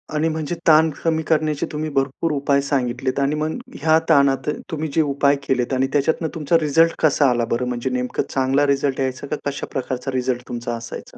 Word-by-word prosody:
आणि 155 +2 +1
म्हणजे 160 +1 -3
ताण 160 0 +6
कमी 160 -1 +1
करण्याचे 155 -2 +1
तुम्ही 155 +1 -3
भरपूर 135 +4 0
उपाय 140 -1 +1
सांगितलेत 130 -1 -1
आणि 140 +2 +1
मग 155 +1 -2 0.2
ह्या 160 +1 +4
ताणात 140 -3 +3 0.2
तुम्ही 160 0 -2
जे 160 - +3
उपाय 140 -1 +2
केलेत 125 0 0
आणि 130 +1 +1
त्याच्यातून 160 +3 +1
तुमचा 165 +1 +2
रिझल्ट 165 +2 +3
कसा 145 -3 +3
आला 120 -1 +1
बरं? 115 +2 -1
म्हणजे 125 +1 -2
नेमकं 125 0 -2
चांगला 135 +2 +1
रिझल्ट 140 -1 0
यायचा 130 +1 -2
का 150 - -2
कशा 140 - -5
प्रकारचा 130 0 -3
रिझल्ट 125 -1 -2
तुमचा 120 0 -4
असायचा? 115 0 -9
140 Hz, 190 wpm, -21 LUFS, 130-155 Hz, 0.2 s, ताण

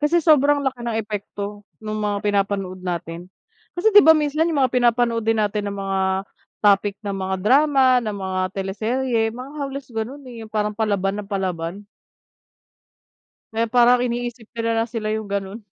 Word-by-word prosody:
Kasi 325 +4 +3
sobrang 290 -2 +5
laki 265 -2 -2
ng 230 -2 -2
epekto 205 -1 -6 0.2
nung 215 -1 -4
mga 205 0 -2
pinapanood 195 -2 -1
natin. 175 -1 -5 0.5
Kasi 425 +5 +2
'di 415 - +11
ba, 320 - +9
minsan 305 +2 +1
yung 300 -4 0
mga 255 - 0
pinapanood 240 -2 +2
din 225 0 +1
natin 205 0 -1
na - - -5
mga 195 0 -1 0.6
topic 205 -1 +3
na 200 - -2
mga 190 0 -2
drama, 270 +6 +4 0.2
ng 215 -2 -3
mga 190 -1 -2
teleserye, 225 +5 -1
mga 250 +4 -8
halos 275 -1 -5
ganun, 250 +6 -4
eh, 235 -2 -9
yung 220 - -11
parang 210 -1 -1
palaban 205 -2 -1
na - - -11
palaban. 190 -1 -3 1.7
Kaya 225 +1 +1
parang 245 0 +5
iniisip 240 -1 -3
nila 230 -1 -2
na 225 - +2
sila 220 -2 -4
yung 220 0 -2
ganun. 200 +2 -4
220 Hz, 165 wpm, -22 LUFS, 200-250 Hz, 1.7 s, di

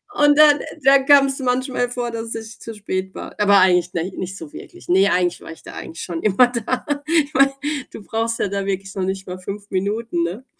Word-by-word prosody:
und 290 0 +4
dann 300 -1 +7 0.2
dann 270 0 +5
kam's 275 -1 +5
manchmal 250 -1 -1
vor, 245 -1 -3
dass 230 0 -5
ich 225 +1 -8
zu 230 - -7
spät 190 -2 -4
war. - - -9
Aber 200 -1 +5
eigentlich, 180 -1 +3
nei 170 +3 -2
nicht 190 +1 -5
so 160 -5 -10
wirklich. - - -12
Ne, 190 +3 +4
eigentlich 180 -1 0
war - - -10
ich 165 - -13
da - - -10
eigentlich 165 - -8
schon 170 -2 -5
immer 215 +4 +5
da. 245 +2 -3 0.2
Ich 310 -2 +1
meine, 275 0 +4 0.4
du 210 - -10
brauchst 225 +1 -2
ja - - +1
da 200 0 -3
wirklich 195 0 -3
noch 190 - -2
nicht 190 +1 -3
mal 180 0 -6
5 200 +2 -8
Minuten, 200 -1 -1
ne? 185 +10 -5
210 Hz, 220 wpm, -20 LUFS, 185-250 Hz, 0.4 s, dann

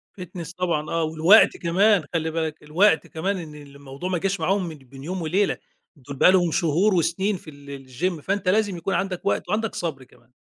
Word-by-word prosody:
fitness 175 -3 -8
طبعًا 165 -4 -1
آه، 165 0 0
والوقت 160 +7 +5
كمان 190 +2 +3
خلّي 160 -1 -1
بالك، 160 -1 -3
الوقت 160 +4 +2
كمان 190 +5 -2
إن 160 -4 -8
الموضوع 140 +2 -9
ما 185 - 0
جاش 195 +2 -1
معاهم 185 +3 0
من 160 - -7
بين 135 0 -14
يوم 180 +4 -4
وليلة 185 +5 0 0.4
دول 140 -1 -10
بقي 180 - +6
لهم 175 -3 +2
شهور 175 +5 +2
وسنين 190 +4 0
في 170 - -13
ال 140 -2 -11
الgym، 160 +6 -3
فأنت 195 +2 -1
لازم 205 -2 +1
يكون 180 +4 -3
عَندك 185 -2 -2
وقت 200 - -1
وعَندك 215 +2 -1
صَبر 155 -6 -4
كمان. 120 -1 -24
170 Hz, 195 wpm, -23 LUFS, 150-190 Hz, 0.4 s, بقي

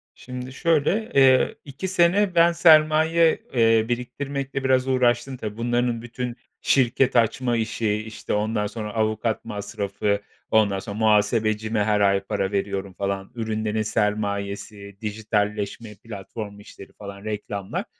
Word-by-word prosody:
Şimdi, 125 0 -8
şöyle, 170 +8 +1
eee, 130 -1 +5
2 145 +7 -5
sene 185 +1 +2
ben 170 0 +6
sermaye, 160 0 +4
eee, 115 -2 +4
biriktirmekle 135 +3 -3
biraz 130 0 +2
uğraştım, 125 0 +1
tabii, 110 -1 -6
bunların 120 0 0
bütün 120 0 -5 0.3
şirket 130 0 +2
açma 120 +1 +2
işi, 110 -1 -1
işte, 110 +1 -5
ondan 105 0 0
sonra 105 -1 -6
avukat 110 0 -1
masrafı, 100 0 -2 0.3
ondan 105 -3 +3
sonra 100 +1 -7
muhasebecime 110 0 +2
her 105 -1 +1
ay 100 -1 +4
para 95 0 -2
veriyorum 100 -1 -2
falan. 100 0 -3
Ürünlerin 110 -1 -2
sermayesi, 100 -1 -2
dijitalleşme, 105 0 -2
platform 105 -1 -8
işleri 100 -1 -13
falan 100 -1 -10
reklamlar, 100 -2 -4
110 Hz, 125 wpm, -24 LUFS, 105-130 Hz, 0.3 s, ben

